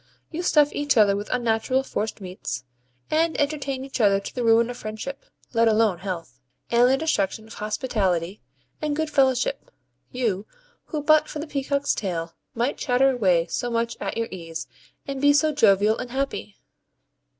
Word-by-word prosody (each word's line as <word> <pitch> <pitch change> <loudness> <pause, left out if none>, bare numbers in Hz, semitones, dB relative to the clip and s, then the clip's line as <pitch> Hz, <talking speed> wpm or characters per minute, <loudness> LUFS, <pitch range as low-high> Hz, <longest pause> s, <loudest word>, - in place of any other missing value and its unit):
You 335 +1 -3
stuff 300 -4 +4
each 290 -2 +1
other 205 -2 +5
with 205 +1 -5
unnatural 245 +2 +1
forced 220 -5 -3
meats, 180 -9 -5 0.5
and 320 +1 +2
entertain 280 -2 -1
each 270 -2 -3
other 200 -2 +4
to 200 - -8
the 250 - -2
ruin 230 +1 +4
of 245 - -8
friendship 220 +6 -6 0.3
(let 230 0 +4
alone 215 -5 +3
health) 170 -9 -6 0.3
and 240 +1 +5
the 265 - +3
destruction 220 -8 -1
of 220 - -12
hospitality 205 -4 -1 0.4
and 300 -1 -1
good 315 0 -2
fellowship 275 - +1 0.4
you, 220 -5 -1 0.4
who 305 -3 -4
but 310 0 +5
for - - -6
the 300 - -4
peacock's 280 -1 0
tail 170 -4 -3 0.2
might 240 +4 -1
chatter 265 +1 +3
away 185 -9 +2
so 245 - -3
much 230 0 -1
at - - -4
your 230 0 -1
ease, 165 -3 -6 0.4
and 275 -1 -4
be 285 0 +6
so 310 +2 +3
jovial 210 -5 +4
and 250 - -5
happy! 270 +2 -3
240 Hz, 170 wpm, -24 LUFS, 205-280 Hz, 0.5 s, be